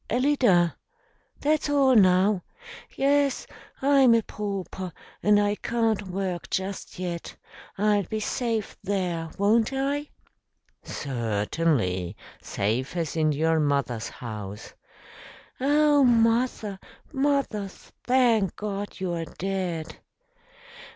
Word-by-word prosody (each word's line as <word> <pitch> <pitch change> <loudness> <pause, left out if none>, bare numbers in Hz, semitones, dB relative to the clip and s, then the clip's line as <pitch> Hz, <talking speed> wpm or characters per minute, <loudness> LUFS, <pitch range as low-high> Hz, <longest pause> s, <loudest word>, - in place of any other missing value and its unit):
"Alida 240 - +3 0.6
that's 300 0 +1
all 275 -3 +4
now. 190 -1 +4 0.5
Yes, 280 -1 +2 0.4
I'm 270 -4 +6
a 230 - +2
pauper 195 -3 -5 0.3
and 205 0 +4
I 205 0 +2
can't 220 -2 -1
work 185 -1 -3
just 190 +1 -4
yet. 175 -2 -5 0.4
I'll 205 0 +3
be 215 +5 -3
safe 225 -1 -2
there, 175 -5 -2
won't 215 +4 +3
I?" 280 +2 -1 0.7
"Certainly, 110 - -1 0.2
safe 120 - -2
as 165 -3 -2
in 155 -1 +2
your 160 +2 +2
mother's 140 -6 0
house." 105 -3 -8 0.9
"Oh, 290 +1 +4
mother, 230 -4 +2 0.3
mother; 270 -7 0
thank 230 -1 0
God, 205 -1 -5
you 185 -2 -2
are 165 -1 -3
dead!" 180 -3 -4
200 Hz, 100 wpm, -26 LUFS, 165-240 Hz, 0.9 s, I'm